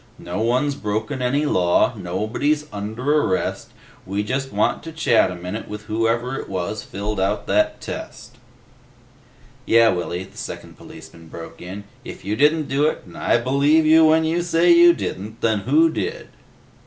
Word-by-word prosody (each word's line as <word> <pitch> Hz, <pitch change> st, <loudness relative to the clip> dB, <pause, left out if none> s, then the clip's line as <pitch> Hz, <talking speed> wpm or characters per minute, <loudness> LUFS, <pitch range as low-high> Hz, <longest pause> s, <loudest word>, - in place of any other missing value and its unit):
"No -, -, -5 dB
one's 125 Hz, +5 st, +1 dB
broken 110 Hz, +2 st, -3 dB
any 140 Hz, +4 st, +1 dB
law. 90 Hz, 0 st, +2 dB
Nobody's 110 Hz, +11 st, -1 dB
under 120 Hz, +9 st, 0 dB
arrest. 95 Hz, -, -2 dB, 0.3 s
We 100 Hz, +2 st, -2 dB
just 135 Hz, +5 st, -3 dB
want -, -, 0 dB
to 165 Hz, -, -8 dB
chat 160 Hz, -, +2 dB
a 90 Hz, -, -6 dB
minute 90 Hz, +5 st, -6 dB
with 105 Hz, 0 st, -7 dB
whoever 115 Hz, +4 st, -1 dB
it -, -, -8 dB
was 95 Hz, +3 st, -3 dB
filled 105 Hz, +1 st, -5 dB
out 100 Hz, +2 st, -1 dB
that 105 Hz, +2 st, +1 dB
test." -, -, -8 dB, 1.3 s
"Yeh, 115 Hz, 0 st, +5 dB
Willy," 90 Hz, 0 st, -3 dB
the 95 Hz, -, -16 dB
second -, -, -8 dB
policeman 85 Hz, -1 st, -13 dB
broke 80 Hz, +1 st, -10 dB
in, 95 Hz, +3 st, -8 dB, 0.2 s
"if -, -, -10 dB
you 105 Hz, +2 st, -1 dB
didn't 150 Hz, +3 st, +2 dB
do 140 Hz, +3 st, +2 dB
it, -, -, -3 dB
and -, -, -14 dB
I -, -, +2 dB
believe 140 Hz, +6 st, +2 dB
you 160 Hz, +1 st, +6 dB
when 160 Hz, +1 st, +4 dB
you 165 Hz, +2 st, 0 dB
say 170 Hz, 0 st, +3 dB
you 170 Hz, 0 st, +8 dB
didn't, 105 Hz, -, -6 dB
then 110 Hz, -2 st, +1 dB
who 145 Hz, +10 st, +3 dB
did?" 455 Hz, -, -4 dB
115 Hz, 165 wpm, -21 LUFS, 100-150 Hz, 1.3 s, you